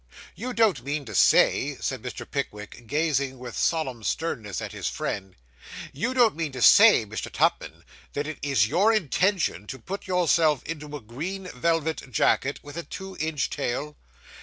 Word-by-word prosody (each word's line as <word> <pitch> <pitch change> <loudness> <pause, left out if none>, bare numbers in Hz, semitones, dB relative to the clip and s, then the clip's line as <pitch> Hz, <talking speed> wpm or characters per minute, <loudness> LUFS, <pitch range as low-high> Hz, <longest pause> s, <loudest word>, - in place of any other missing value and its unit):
'You 250 +4 -5
don't 215 - +2
mean 145 +1 -3
to 110 - -8
say,' - - +4
said - - -3
Mr. - - -6
Pickwick, 105 +3 -5
gazing 140 -1 0
with 125 -2 -8
solemn 130 -9 -1
sternness 105 - -2
at - - -6
his - - -4
friend 95 -1 -4 0.6
'you 235 - -2
don't 235 -7 +4
mean 160 -2 -3
to 130 - -6
say, 210 - +8
Mr. 110 +1 -6
Tupman, - - 0 0.3
that 145 - -2
it 155 -1 -6
is 135 -7 +2
your 200 - +3
intention 180 - +1
to 130 - -6
put 190 - -7
yourself 165 -5 +2
into 150 -2 -6
a - - -13
green 165 - -6
velvet 160 -4 -1
jacket, 135 +4 +1
with 145 +2 -10
a 170 - -3
two 190 +2 -8
inch 155 -3 -1
tail? 145 +5 -3
150 Hz, 165 wpm, -26 LUFS, 125-170 Hz, 0.6 s, say